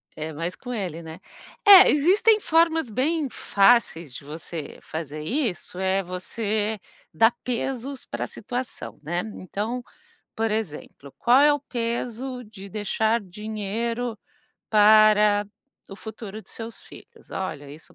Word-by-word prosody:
É 155 +1 -5
mais 165 +4 -4
com 250 -1 -7
ele, 180 -7 -4
né. 160 +1 -9 0.5
É, 395 -2 +10
existem 390 +9 +4
formas 325 - +2
bem 285 +7 0
fáceis 195 - +2
de 140 - -9
você 155 +1 -7
fazer 155 -1 -6
isso, 215 - -3
é 190 +1 +1
você 210 +4 -2 0.3
dar 225 +1 +5
pesos 255 +2 -3
pra 120 +1 -4
situação, 245 - -6
né. 170 +4 -2
Então, 215 +7 -4 0.5
por 225 0 0
exemplo, 155 -9 -5
qual 245 +3 +5
é 295 0 +6
o 290 - -1
peso 245 +1 -4
de 205 -2 -11
deixar 220 +3 0
dinheiro 220 +4 -4 0.5
para 210 -1 +6 0.4
o 195 - -9
futuro 220 -1 -8
dos - - -15
seus 225 0 -8
filhos? - - -16
Olha, 150 -7 -5
isso 155 +3 -14
215 Hz, 130 wpm, -25 LUFS, 185-245 Hz, 0.5 s, É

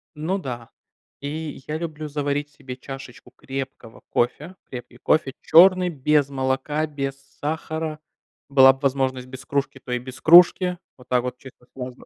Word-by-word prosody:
Ну 165 +6 -1
да. 120 -8 -6 0.5
И 150 -1 -5
я 155 +1 -2
люблю 155 -2 -5
заварить 145 0 -2
себе 140 -3 -9
чашечку 130 -2 -10
крепкого 135 -4 -7
кофе. 150 +9 -1
Крепкий 120 -1 -9
кофе 135 0 +1
черный, 185 +2 +6
без 150 -2 +2
молока, 135 +3 -1
без 140 -3 -4 0.2
сахара. 155 +1 -3 0.5
Была 135 -1 +8
бы 135 - -15
возможность 130 -2 0
без 130 +1 -10
кружки, 140 0 -2
то 125 - -8
и 125 - 0
без 130 +1 -10
кружки. 180 +2 +7 0.2
Вот 125 - -17
так 125 -1 +2
вот 125 0 -4
чисто 125 -1 -15
сложно. 125 -1 -8
140 Hz, 155 wpm, -23 LUFS, 130-155 Hz, 0.5 s, Была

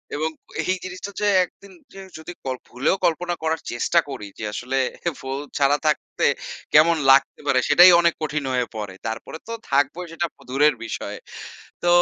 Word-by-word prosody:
এবং 155 +2 -1 0.3
এই 185 - +1
জিনিসটা 185 +2 -6
যে, 210 - +2 0.2
১ 180 - -6
দিন 200 -1 -14 0.2
জিন 195 0 -10
যদি 160 - -8
কল 130 -1 -2
ভুলেও 130 +9 +1
কল্পনা 175 +2 0
করার 160 0 0
চেষ্টা 120 +8 +2
করি 105 - -6
যে, - - -6
আসলে 130 +4 -3 0.4
ফোন 135 +1 -4 0.2
ছাড়া 145 +1 +3
থাকতে 150 - 0 0.5
কেমন 160 +2 +6
লাগতে 135 +1 +3
পারে? 130 - +4
সেটাই 175 +5 +9
অনেক 170 -1 +3
কঠিন 150 -1 -2
হয়ে 125 -1 +1
পড়ে। 105 -3 -5
তারপরে 115 +7 -5
তো - - -6 0.2
থাকবই, 145 +6 +1
সেটা 170 +1 -1
প - - -47
দূরের 145 +4 +3
বিষয়। 115 - -5 0.7
তো - - 0
150 Hz, 175 wpm, -23 LUFS, 135-175 Hz, 0.7 s, সেটাই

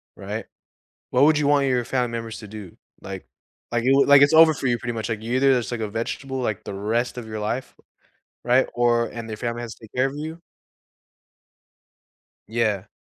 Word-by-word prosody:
Right? - - -5 0.7
What 130 +3 +4
would 155 0 +5
you 145 - +1
want 145 -1 +3
your 125 -2 +1
family 125 -1 0
members 115 -1 -5
to 105 - -10
do? 100 -4 -10 0.2
Like 95 -1 -8 0.5
like, 120 0 0
it 130 - +3
wa 140 - +5
like, 145 -1 +8
it's 140 +2 +5
over 160 0 +7
for 135 - -4
you 120 -1 +1
pretty 120 0 -4
much, 110 -2 -3
like, 110 -1 -3
you 115 +3 -3
either 135 +1 +4
just 125 -3 0
take 120 - -3
a 110 - -2
vegetable, 130 +5 -4
like, 110 -5 -2
the - - -6
rest 115 +5 -1
of 120 - -6
your 110 -1 -5
life. 120 +5 -3 0.7
Right? 125 +2 +3
Or 120 -1 +2
and 115 -1 -8
their 110 - -5
family 120 0 -3
has 120 -2 -7
to - - -23
take 105 - -20
care 130 - +3
of 135 - -6
you 160 +3 -6 2.1
Yeah. 110 -4 0
120 Hz, 210 wpm, -23 LUFS, 110-135 Hz, 2.1 s, like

